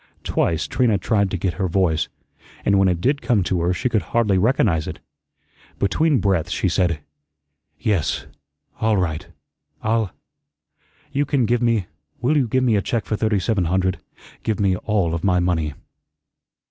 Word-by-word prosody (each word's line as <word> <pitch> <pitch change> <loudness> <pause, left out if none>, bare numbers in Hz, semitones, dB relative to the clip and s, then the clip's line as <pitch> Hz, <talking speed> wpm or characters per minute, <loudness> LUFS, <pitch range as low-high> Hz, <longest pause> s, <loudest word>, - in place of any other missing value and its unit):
Twice 80 -1 0
Trina 115 -5 +2
tried 100 +1 +1
to 95 - -2
get 90 0 -1
her 95 - +2
voice, 85 -3 +1 0.6
and 100 -1 +4
when 95 - +4
it 90 -2 0
did 140 +6 +1
come 110 -6 +2
to 90 +1 0
her, 85 +1 +1
she 110 +8 0
could 110 -4 +1
hardly 105 0 +1
recognize 100 - +2
it. - - -5 0.8
Between 145 - +2
breaths 95 -6 +1
she 95 - 0
said: 85 -4 +1 0.8
"Yes, 95 -9 0 0.5
all 110 -1 +2
right 80 -5 -1 0.6
I'll 110 -2 +1 1.0
you 140 - +1
can 140 -3 +1
give 120 +2 +1
me 115 -5 +2 0.3
will 145 +6 +1
you 135 -5 +2
give 130 +3 +1
me 120 -4 +3
a 100 - +2
check 115 +1 -2
for 110 - -1
thirty 110 0 +1
seven 100 -1 0
hundred? 95 +2 0 0.4
Give 110 -1 -1
me 95 -2 +2
ALL 95 -4 0
of 85 - -3
my 90 -2 +3
money." 80 -4 0
100 Hz, 170 wpm, -22 LUFS, 90-115 Hz, 1.0 s, and